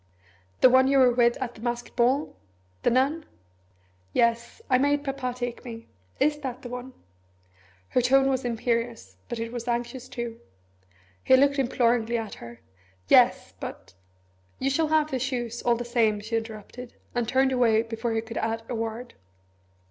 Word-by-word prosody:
"The 255 - +8
one 260 +1 +6
you 275 0 +3
were 255 -2 +6
with 240 0 +3
at 250 -3 -4
the 220 - -14
masked 240 0 -4
ball? 255 +5 +1 0.5
The - - +3
nun? 275 +6 +1 0.9
Yes 235 - +1
I 255 -2 +3
made 285 +1 +2
Papa 270 -3 -3
take 245 -1 -4
me. 230 -2 -9 0.3
Is 295 0 +2
it - - -16
that 255 -2 -6
one?" 250 +1 -7 1.0
Her 250 - +2
tone 270 +2 +4
was 265 -1 0
imperious, 235 0 -2
but 240 - -3
it 230 0 -4
was 240 0 -6
anxious 240 +1 -3
too. 235 -1 -5 0.8
He 260 - +6
looked 280 +1 +3
imploringly 240 -2 +1
at 225 -2 -5
her. 120 0 -11 0.5
"Yes, - - +4
but - - -8 0.3
" 95 0 -38
"You 270 +1 0
shall 315 +3 +1
have 310 0 +2
the 260 - -1
shoes, 240 -2 -3
all 240 -1 +2
the 240 +1 -5
same," 230 -3 +2
she 220 +2 -4
interrupted, 225 +2 -6 0.2
and 240 -2 -1
turned 265 0 +3
away 230 -3 +3
before 225 0 -3
he 225 - 0
could 230 0 -8
add 225 0 -2
a - - -4
word. 230 +1 -4
240 Hz, 170 wpm, -26 LUFS, 230-260 Hz, 1.0 s, The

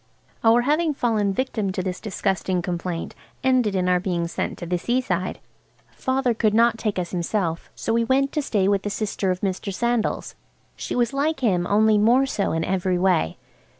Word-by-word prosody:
Our 230 +1 +5
having 300 +4 +1
fallen 220 -6 +1
victims 215 -3 -2
to 185 - -2
this 185 0 -4
disgusting 190 -3 -1
complaint 175 -1 -3 0.3
ended 250 -6 +2
in 180 -1 +1
our 180 0 +3
being 175 -2 -1
sent 170 - -3
to 175 - -6
the 175 +1 -1
seaside. 195 -5 -1 0.5
Father 260 -2 0
could 215 -1 +1
not 230 0 +4
take 210 -4 -1
us 175 -1 -3
himself, 175 -1 -2
so 225 - -2
we 230 0 +2
went 270 +3 +2
to 300 - 0
stay 205 -8 +1
with 200 -1 +2
a 205 - -2
sister 200 -2 -2
of 185 0 -1
Mr. 195 +1 -2
Sandal's. 235 +3 -1 0.4
She - - -5
was 240 0 +1
like 285 +1 0
him, 180 -7 +1
only 215 +1 +4
more 240 +6 +4
so 210 -7 -1
in 165 0 -1
every 185 0 0
way. 175 - +1
205 Hz, 185 wpm, -23 LUFS, 185-240 Hz, 0.5 s, Our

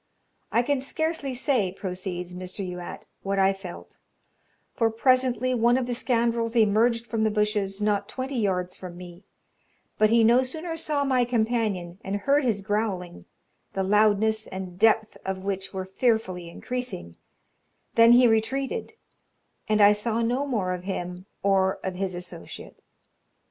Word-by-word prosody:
"I 235 - +3
can 280 +1 0
scarcely 290 -1 -2
say," 245 -8 +1
proceeds 180 -2 -5
Mr. 185 +2 -5
Youatt, 180 -1 -7 0.2
"what 195 0 -2
I 195 0 +4
felt; 190 -2 -10 0.7
for 230 -2 +2
presently 255 +2 +2
one 240 +1 +3
of 260 - 0
the 245 - -2
scoundrels 235 -1 0
emerged 230 +2 +3
from 225 -2 -1
the 220 - +3
bushes, 210 -2 0
not 205 -1 0
twenty 260 0 -3
yards 185 -4 -1
from 180 -2 -9
me; 175 +1 -11 0.7
but 215 0 +5
he 230 0 +5
no 235 +3 +6
sooner 320 +6 -4
saw 300 -3 -1
my 260 -3 +2
companion, 220 -7 -1
and 195 +1 -3
heard 280 +8 +2
his 215 -6 0
growling, 195 - -2 0.5
the 195 - -1
loudness 215 +2 +3
and 185 -1 -7
depth 220 -1 +3
of 190 0 -4
which 195 -1 -3
were 190 -1 -4
fearfully 190 -4 0
increasing, 245 - -5 0.8
than 230 +1 +7
he 245 0 +7
retreated, 235 +5 0 0.7
and 215 -1 +3
I 205 0 +8
saw 225 +2 -1
no 250 +5 0
more 200 -9 -1
of 180 - -5
him 180 -1 -5 0.2
or 190 -1 +3
of 190 - -2
his 185 0 -3
associate. 175 -1 -9
215 Hz, 150 wpm, -26 LUFS, 190-240 Hz, 0.8 s, I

